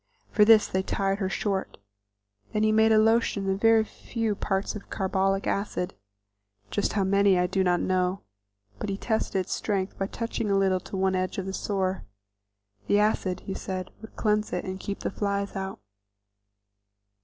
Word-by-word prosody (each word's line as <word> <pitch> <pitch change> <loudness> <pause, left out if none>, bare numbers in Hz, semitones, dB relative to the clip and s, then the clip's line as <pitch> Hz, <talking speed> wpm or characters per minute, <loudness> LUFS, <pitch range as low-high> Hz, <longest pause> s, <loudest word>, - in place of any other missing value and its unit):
For 210 - +5
this 220 0 +7
they 190 - 0
tied 195 0 -1
her 190 -2 -1
short; 195 -1 -2 0.8
then 215 - +1
he 215 - +4
made 220 +1 +4
a 220 - +6
lotion 220 -2 +3
and 195 - +1
a - - -1
very 225 0 +5
few 225 0 -3
parts 195 +1 -2
carbolic 195 0 0
acid, 200 -3 -2 0.8
just 205 - 0
how 200 - +1
many 200 0 +4
I 180 - +3
do 190 +1 +1
not 175 -1 +2
know, 185 0 0 0.6
but - - -3
he 195 - -2
tested 220 -3 0
its 185 - -4
strength 195 -2 -2
by 195 - 0
touching 230 -1 -3
a 200 - +3
little 190 -1 +2
to 190 - -7
one 190 0 +2
edge 185 0 -1
of 190 - -2
the 190 - -4
sore. 190 -2 -1 0.8
The 205 - +4
acid, 200 -3 +1
he 195 - -5
said, 185 -1 -5
would 220 - -12
cleanse 210 -1 +1
it 180 - -2
and 190 0 -5
keep 200 +1 -5
the - - -2
flies 200 0 -2
out. 190 0 -4
195 Hz, 180 wpm, -27 LUFS, 190-210 Hz, 0.8 s, this